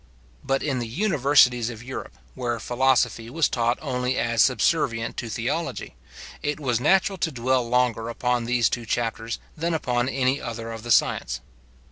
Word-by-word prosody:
But 135 Hz, 0 st, 0 dB
in 135 Hz, -4 st, -1 dB
the 120 Hz, -, -3 dB
universities 135 Hz, -, +3 dB
of 120 Hz, -1 st, -8 dB
Europe, 130 Hz, +2 st, -7 dB, 0.2 s
where 120 Hz, -2 st, -2 dB
philosophy 120 Hz, -1 st, +1 dB
was 160 Hz, +5 st, +2 dB
taught 120 Hz, 0 st, 0 dB
only 125 Hz, -2 st, -1 dB
as 115 Hz, -1 st, +2 dB
subservient 130 Hz, -4 st, +2 dB
to 115 Hz, -, -4 dB
theology, 85 Hz, -, -3 dB, 0.5 s
it 150 Hz, +1 st, -2 dB
was 125 Hz, -6 st, 0 dB
natural 190 Hz, +6 st, +2 dB
to 160 Hz, -, 0 dB
dwell 125 Hz, -1 st, 0 dB
longer 120 Hz, -2 st, +1 dB
upon 125 Hz, 0 st, -1 dB
these 120 Hz, -1 st, +2 dB
two 120 Hz, -2 st, -3 dB
chapters 115 Hz, -1 st, -2 dB, 0.2 s
than 165 Hz, +1 st, -1 dB
upon 125 Hz, -4 st, 0 dB
any 130 Hz, +1 st, 0 dB
other 115 Hz, -1 st, -5 dB
of 115 Hz, -1 st, -7 dB
the 120 Hz, -, -9 dB
science. 65 Hz, -, +2 dB
125 Hz, 160 wpm, -24 LUFS, 115-135 Hz, 0.5 s, universities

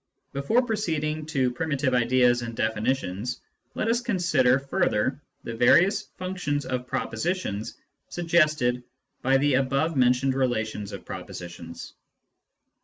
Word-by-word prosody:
Before 140 Hz, -, +2 dB
proceeding 155 Hz, -9 st, -2 dB
to 130 Hz, -5 st, +1 dB
primitive 140 Hz, 0 st, -1 dB
ideas 125 Hz, 0 st, +3 dB
and 115 Hz, -1 st, -5 dB
definitions, 110 Hz, 0 st, -1 dB, 0.4 s
let -, -, -1 dB
us 235 Hz, +1 st, +2 dB
consider 170 Hz, -, +3 dB
further 135 Hz, -, 0 dB, 0.2 s
the 115 Hz, -, -5 dB
various 170 Hz, -, +4 dB, 0.2 s
functions 180 Hz, -6 st, -2 dB
of 125 Hz, -1 st, -3 dB
propositions 115 Hz, -, -2 dB, 0.3 s
suggested 155 Hz, -8 st, +2 dB, 0.4 s
by 135 Hz, +1 st, +3 dB
the 145 Hz, +1 st, +2 dB
above 135 Hz, +5 st, +1 dB
mentioned 125 Hz, +1 st, +3 dB
relations 110 Hz, -6 st, -1 dB
of 100 Hz, -, -8 dB
propositions. 85 Hz, -1 st, -8 dB
135 Hz, 110 wpm, -26 LUFS, 120-160 Hz, 0.4 s, various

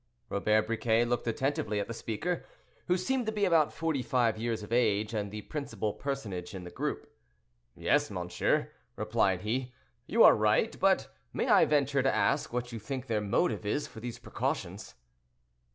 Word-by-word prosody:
Robert 105 Hz, +2 st, +2 dB
Briquet 115 Hz, +1 st, +2 dB
looked 120 Hz, 0 st, -1 dB
attentively 115 Hz, -3 st, -1 dB
at 100 Hz, -, -2 dB
the 115 Hz, -, -5 dB
speaker, 140 Hz, +11 st, -3 dB, 0.4 s
who 180 Hz, -, +3 dB
seemed 245 Hz, +6 st, -1 dB
to -, -, +1 dB
be 210 Hz, -2 st, +1 dB
about 165 Hz, -5 st, +4 dB
forty 160 Hz, -5 st, -1 dB
five 120 Hz, -3 st, +1 dB
years 115 Hz, -1 st, -2 dB
of 110 Hz, -, -6 dB
age, 110 Hz, -2 st, +2 dB
and 105 Hz, -2 st, -2 dB
the 105 Hz, +1 st, -7 dB
principal 140 Hz, -8 st, -3 dB
personage 105 Hz, -10 st, -4 dB
in 95 Hz, -, -6 dB
the 90 Hz, -, -9 dB
group. -, -, -4 dB, 0.6 s
"Yes, 145 Hz, +13 st, +2 dB
monsieur," 90 Hz, -2 st, -1 dB, 0.2 s
replied 110 Hz, -4 st, +1 dB
he, 125 Hz, +4 st, -2 dB, 0.3 s
"you -, -, +5 dB
are -, -, +9 dB
right: -, -, +2 dB
but -, -, +2 dB, 0.2 s
may -, -, -1 dB
I -, -, +7 dB
venture 140 Hz, -2 st, +2 dB
to 135 Hz, -, +2 dB
ask 145 Hz, -, +1 dB
what 125 Hz, 0 st, -3 dB
you 115 Hz, -, -5 dB
think 130 Hz, +4 st, -5 dB
their 110 Hz, -4 st, 0 dB
motive 105 Hz, -, 0 dB
is 105 Hz, +8 st, -1 dB
for -, -, -11 dB
these 120 Hz, +1 st, -6 dB
precautions?" -, -, -4 dB
115 Hz, 175 wpm, -30 LUFS, 105-140 Hz, 0.6 s, are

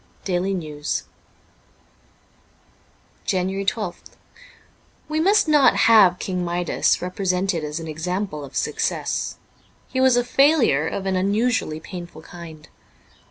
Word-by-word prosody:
' -, -, -32 dB
Daily 190 Hz, +2 st, 0 dB
News:' 150 Hz, -4 st, -3 dB, 2.2 s
JANUARY 190 Hz, +1 st, -1 dB
1 -, -, -19 dB, 0.3 s
2th -, -, -26 dB, 1.1 s
WE 310 Hz, 0 st, -1 dB
must 395 Hz, +3 st, +3 dB
not 295 Hz, -3 st, +5 dB
have 205 Hz, -6 st, +6 dB
King 180 Hz, -1 st, -3 dB
Midas 175 Hz, 0 st, 0 dB
represented 185 Hz, -1 st, -1 dB
as 150 Hz, +2 st, -4 dB
an 165 Hz, -, -7 dB
example 165 Hz, +1 st, -3 dB
of 140 Hz, -, -11 dB
success; -, -, -2 dB, 0.5 s
he 260 Hz, -, -1 dB
was 260 Hz, -2 st, +5 dB
a 245 Hz, -, +3 dB
failure 250 Hz, -, +3 dB
of 195 Hz, -, -4 dB
an 190 Hz, -1 st, 0 dB
unusually 200 Hz, -3 st, 0 dB
painful 175 Hz, -1 st, -9 dB
kind. 165 Hz, -3 st, -11 dB
185 Hz, 120 wpm, -22 LUFS, 165-220 Hz, 2.2 s, have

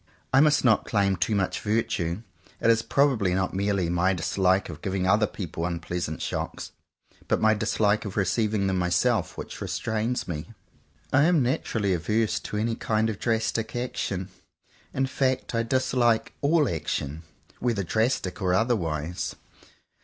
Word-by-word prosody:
I 135 Hz, -, +7 dB
must 150 Hz, -2 st, +4 dB
not 110 Hz, -4 st, +4 dB
claim 100 Hz, -3 st, +2 dB
too 105 Hz, +3 st, 0 dB
much 95 Hz, -2 st, 0 dB
virtue. 105 Hz, -4 st, -1 dB, 0.4 s
It 115 Hz, -, +4 dB
is 115 Hz, 0 st, +3 dB
probably 115 Hz, -10 st, +2 dB
not 95 Hz, -1 st, 0 dB
merely 100 Hz, -2 st, 0 dB
my 90 Hz, +2 st, +2 dB
dislike 95 Hz, +2 st, +1 dB
of 80 Hz, -3 st, -9 dB
giving 95 Hz, -1 st, -1 dB
other 105 Hz, +3 st, +4 dB
people 85 Hz, -5 st, -5 dB
unpleasant 85 Hz, -1 st, -3 dB
shocks, -, -, -4 dB, 0.6 s
but -, -, +2 dB
my 110 Hz, 0 st, +4 dB
dislike 105 Hz, -1 st, +1 dB
of 105 Hz, -2 st, -6 dB
receiving 105 Hz, +1 st, +1 dB
them 95 Hz, -1 st, +1 dB
myself, 90 Hz, +5 st, +1 dB
which -, -, -7 dB
restrains 110 Hz, +3 st, -2 dB
me. 85 Hz, +7 st, -6 dB, 0.6 s
I 145 Hz, +2 st, +5 dB
am 165 Hz, -5 st, +4 dB
naturally 110 Hz, -6 st, 0 dB
averse 105 Hz, +6 st, 0 dB
to 105 Hz, -, -5 dB
any 115 Hz, +2 st, 0 dB
kind 110 Hz, 0 st, 0 dB
of 100 Hz, -, -8 dB
drastic 115 Hz, -1 st, -1 dB
action. 100 Hz, -6 st, -3 dB, 0.6 s
In 135 Hz, -, 0 dB
fact 130 Hz, -1 st, -1 dB
I 115 Hz, -, +2 dB
dislike 120 Hz, -1 st, +1 dB
all 150 Hz, 0 st, +3 dB
action, 75 Hz, -3 st, -3 dB, 0.4 s
whether 115 Hz, -5 st, 0 dB
drastic 110 Hz, -1 st, 0 dB
or 90 Hz, -1 st, +2 dB
otherwise. 90 Hz, -8 st, -1 dB
105 Hz, 150 wpm, -26 LUFS, 90-115 Hz, 0.6 s, I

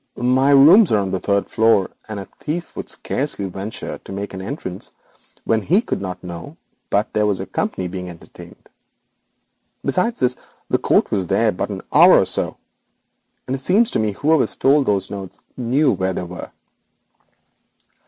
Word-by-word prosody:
My 130 Hz, +3 st, +2 dB
rooms 160 Hz, +9 st, +7 dB
are 110 Hz, -, +4 dB
on 95 Hz, -2 st, -1 dB
the 95 Hz, -, -1 dB
third 100 Hz, +1 st, 0 dB
floor, 110 Hz, -4 st, +2 dB, 0.2 s
and 105 Hz, -2 st, -4 dB
a 100 Hz, -, -7 dB
thief 165 Hz, +3 st, -5 dB
would -, -, -6 dB
scarcely 135 Hz, -7 st, -2 dB
venture 95 Hz, +3 st, -6 dB
to -, -, -12 dB
make 100 Hz, +1 st, -5 dB
an 95 Hz, -, -6 dB
entrance 95 Hz, -, -6 dB, 0.5 s
when 110 Hz, -1 st, +1 dB
he 180 Hz, -, +3 dB
could 230 Hz, -, -3 dB
not 90 Hz, -2 st, -5 dB
but -, -, -8 dB
know 85 Hz, -1 st, -8 dB, 0.6 s
there 105 Hz, 0 st, +2 dB
was 100 Hz, -3 st, 0 dB
a -, -, -4 dB
company 95 Hz, -, -3 dB
being 90 Hz, 0 st, -6 dB
entertained. 85 Hz, -2 st, -13 dB, 1.2 s
Besides 230 Hz, +6 st, 0 dB
this, 125 Hz, 0 st, +2 dB, 0.4 s
the -, -, +3 dB
coat -, -, +2 dB
was 95 Hz, -3 st, 0 dB
there 105 Hz, +4 st, +2 dB
less 90 Hz, -, -3 dB
than 100 Hz, -3 st, -6 dB
an -, -, -33 dB
hour, -, -, +8 dB
and -, -, -5 dB, 1.3 s
it 135 Hz, -, -7 dB
appears 220 Hz, -, +3 dB
to -, -, +1 dB
me 110 Hz, -2 st, 0 dB
that -, -, -19 dB
whoever 155 Hz, 0 st, +3 dB
stole 140 Hz, +2 st, +2 dB
those 100 Hz, -5 st, 0 dB
notes 95 Hz, -2 st, -7 dB, 0.2 s
knew 130 Hz, +4 st, +2 dB
where 95 Hz, 0 st, -1 dB
they 90 Hz, -, -3 dB
were.' 90 Hz, 0 st, -8 dB
105 Hz, 175 wpm, -20 LUFS, 95-135 Hz, 1.3 s, hour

